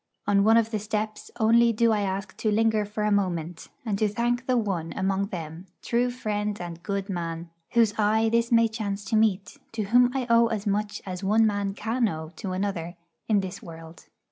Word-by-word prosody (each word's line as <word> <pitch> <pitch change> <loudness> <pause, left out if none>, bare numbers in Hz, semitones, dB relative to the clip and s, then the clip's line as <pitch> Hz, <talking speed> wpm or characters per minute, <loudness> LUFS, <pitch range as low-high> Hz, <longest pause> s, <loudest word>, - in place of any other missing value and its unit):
On 200 -1 +3
one 225 +2 +5
of 225 0 +2
the 215 - -1
steps 215 +1 -4
only 230 +1 +5
do 230 +1 +2
I 210 -1 +1
ask 190 0 -3
to 220 - 0
linger 220 0 +2
for 210 +1 -4
a 210 - +1
moment, 175 -4 -1 0.2
and 205 -3 -1
to 215 - +3
thank 240 +4 -1
the 255 -1 +2
one 190 -7 -2
among 195 +1 0
them, 170 -2 -7 0.2
true 240 +1 +1
friend 210 -4 -3
and 170 -1 -7
good 200 0 -3
man, 170 -3 -4 0.2
whose 230 -3 +4
eye 220 +1 +3
this 235 +1 +1
may 230 -1 +5
chance 210 -3 -4
to 205 - -1
meet, 200 -4 +1
to 220 -1 -2
whom 245 +4 +4
I 260 - -1
owe 235 -1 +5
as 220 -2 -3
much 205 0 -2
as 185 0 -6
one 215 +3 +4
man 200 -2 -1
can 225 +3 0
owe 160 -4 -5
to 195 -4 -4
another 185 -3 -3 0.3
in 205 -2 +3
this 190 +1 -6
world. 165 0 -12
210 Hz, 205 wpm, -26 LUFS, 190-225 Hz, 0.3 s, one